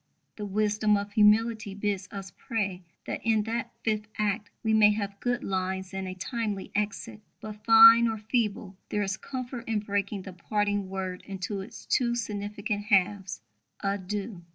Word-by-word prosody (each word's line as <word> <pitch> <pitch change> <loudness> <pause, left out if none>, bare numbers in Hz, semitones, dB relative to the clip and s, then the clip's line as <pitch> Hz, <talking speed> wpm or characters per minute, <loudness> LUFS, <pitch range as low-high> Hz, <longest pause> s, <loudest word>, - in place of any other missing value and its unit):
The 210 -1 -5
wisdom 210 +1 +2
of 200 0 -4
humility 215 0 +3
bids 200 -2 -2
us 195 -2 -7
pray 200 -5 -2 0.2
that - - -4
in 220 -2 +2
that 230 +2 -3
fifth 215 -1 0
act 210 0 -1
we 220 -1 +2
may 215 -1 +7
have 200 -1 -4
good 245 0 -1
lines 190 0 -2
and 190 0 -3
a 185 - -5
timely 210 0 -3
exit; 210 +1 -3 0.2
but, 215 -1 -9
fine 225 +1 +9
or 225 -1 -1
feeble, 210 -3 -2
there 210 - 0
is 195 -1 -1
comfort 250 -1 -6
in 225 -2 0
breaking 200 -1 -2
the 190 - -8
parting 205 +2 -1
word 190 -1 -4
into 195 0 -4
its 190 - -10
two 240 -2 +1
significant 205 -2 -3
halves, 195 - +1 0.4
a 200 0 0
Dieu. 195 0 -5
205 Hz, 165 wpm, -28 LUFS, 195-220 Hz, 0.4 s, fine